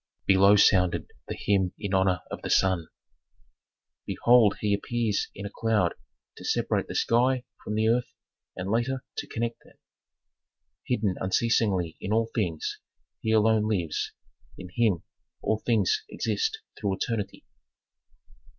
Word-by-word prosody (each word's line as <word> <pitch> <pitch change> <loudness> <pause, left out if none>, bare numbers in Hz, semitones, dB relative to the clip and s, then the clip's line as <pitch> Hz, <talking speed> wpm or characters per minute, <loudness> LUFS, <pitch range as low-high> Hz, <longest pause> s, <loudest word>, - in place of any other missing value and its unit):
Below 100 +1 +6
sounded 90 -3 +3 0.2
the - - -5
hymn 95 -3 +1
in 100 -2 -4
honor 95 -2 +2
of - - -5
the - - -5
sun: 95 -4 +2 1.2
"Behold 120 -4 +4
he 105 -1 +1
appears 110 0 -1
in 100 - -7
a - - -4
cloud 110 -6 +1 0.4
to - - -10
separate - - 0
the - - -6
sky 125 +2 +2 0.2
from 105 - -3
the 110 +1 +2
earth, 120 +2 +1 0.4
and 95 +2 -4
later 125 +4 0
to - - -3
connect 115 0 -3
them. - - -21 1.1
"Hidden 105 -6 0
unceasingly 95 -4 +1
in 100 - -4
all 115 +1 +1
things, 85 -8 -2 0.4
he 110 - -3
alone 110 0 +3
lives, 90 -8 -1 0.5
in 90 - -9
him 110 -8 +2 0.4
all 110 - +1
things 120 - +1
exist 440 -1 -1 0.2
through 100 -3 0
eternity." 100 0 -3
105 Hz, 135 wpm, -27 LUFS, 95-115 Hz, 1.2 s, Below